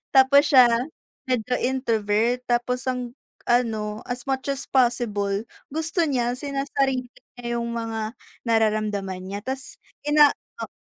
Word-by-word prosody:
tapos 280 Hz, +3 st, +6 dB
siya 255 Hz, -2 st, +9 dB, 0.6 s
medyo 250 Hz, 0 st, 0 dB
introvert 235 Hz, -2 st, +1 dB
tapos 250 Hz, +2 st, 0 dB
ang 250 Hz, -1 st, -3 dB, 0.4 s
ano, 220 Hz, -3 st, +1 dB
as 245 Hz, -1 st, -4 dB
much 265 Hz, -1 st, -1 dB
as 275 Hz, 0 st, -4 dB
possible 220 Hz, -6 st, +1 dB, 0.3 s
gusto 325 Hz, +2 st, 0 dB
niya 245 Hz, -3 st, 0 dB
sinasarili 275 Hz, -2 st, -1 dB, 0.3 s
niya 235 Hz, -1 st, -3 dB
yung 235 Hz, -, -3 dB
mga 225 Hz, -1 st, -3 dB, 0.3 s
nararamdaman 215 Hz, -4 st, +1 dB
niya 200 Hz, +2 st, -5 dB
tas 265 Hz, 0 st, -5 dB, 0.3 s
ina 295 Hz, -1 st, +7 dB, 0.3 s
oo -, -, -5 dB
245 Hz, 120 wpm, -24 LUFS, 220-265 Hz, 0.6 s, siya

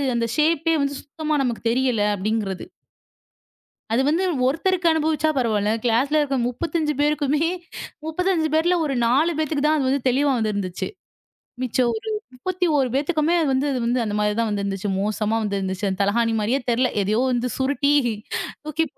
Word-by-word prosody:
அந்த 235 Hz, 0 st, +1 dB
ஷேப்பே 325 Hz, +1 st, +2 dB
வந்து 280 Hz, 0 st, -1 dB
சுத்தமா 305 Hz, +1 st, -3 dB
நமக்குத் 235 Hz, -2 st, -1 dB
தெரியல 250 Hz, -3 st, +1 dB
அப்படிங்கறது. 200 Hz, -1 st, -2 dB, 1.3 s
அது 245 Hz, -, +3 dB
வந்து 325 Hz, +5 st, +2 dB, 0.2 s
ஒருத்தருக்கு 345 Hz, +5 st, +1 dB
அனுபவிச்சா 315 Hz, 0 st, +1 dB
பரவாயில்ல. 215 Hz, -4 st, +1 dB
கிளாஸ்ல 260 Hz, +6 st, +2 dB
இருக்குற 275 Hz, -2 st, 0 dB
35 310 Hz, +4 st, -1 dB
பேருக்குமே 295 Hz, +1 st, +1 dB, 0.6 s
35 335 Hz, 0 st, 0 dB
பேர்ல 345 Hz, +3 st, +3 dB
ஒரு 280 Hz, -3 st, -1 dB
4 290 Hz, +8 st, +3 dB
பேத்துக்கு 305 Hz, -2 st, -1 dB
தான் 310 Hz, +1 st, +3 dB
அது 265 Hz, -2 st, +1 dB
வந்து 275 Hz, +2 st, +1 dB
தெளிவா 275 Hz, +3 st, +2 dB
வந்து 215 Hz, -2 st, 0 dB
இருந்துச்சு. 185 Hz, -3 st, -3 dB, 0.7 s
மிச்சம் 250 Hz, 0 st, +1 dB
ஒரு 220 Hz, -, -6 dB, 0.3 s
31 310 Hz, -1 st, 0 dB
பேத்துக்குமே 305 Hz, +3 st, +1 dB
அது 315 Hz, -, +1 dB
வந்து 265 Hz, +2 st, +1 dB
அது 260 Hz, -, -1 dB
வந்து 245 Hz, +1 st, +1 dB
அந்த 210 Hz, -2 st, -3 dB
மாரி 210 Hz, 0 st, +1 dB
தான் 230 Hz, -, +1 dB
வந்து 205 Hz, -1 st, -1 dB
இருந்துச்சு. 195 Hz, 0 st, -2 dB
மோசமா 215 Hz, +2 st, 0 dB
வந்து 200 Hz, -1 st, -1 dB
இருந்துச்சு. 190 Hz, +1 st, -2 dB
தலகாணி 225 Hz, +3 st, +1 dB
மாரியே 235 Hz, +6 st, +1 dB
தெரியல. 250 Hz, +2 st, +2 dB
எதையோ 210 Hz, +4 st, +1 dB
வந்து 245 Hz, 0 st, -1 dB
சுருட்டி 280 Hz, +2 st, +1 dB, 0.7 s
தூக்கி 305 Hz, +1 st, 0 dB
265 Hz, 160 wpm, -22 LUFS, 225-310 Hz, 1.3 s, அது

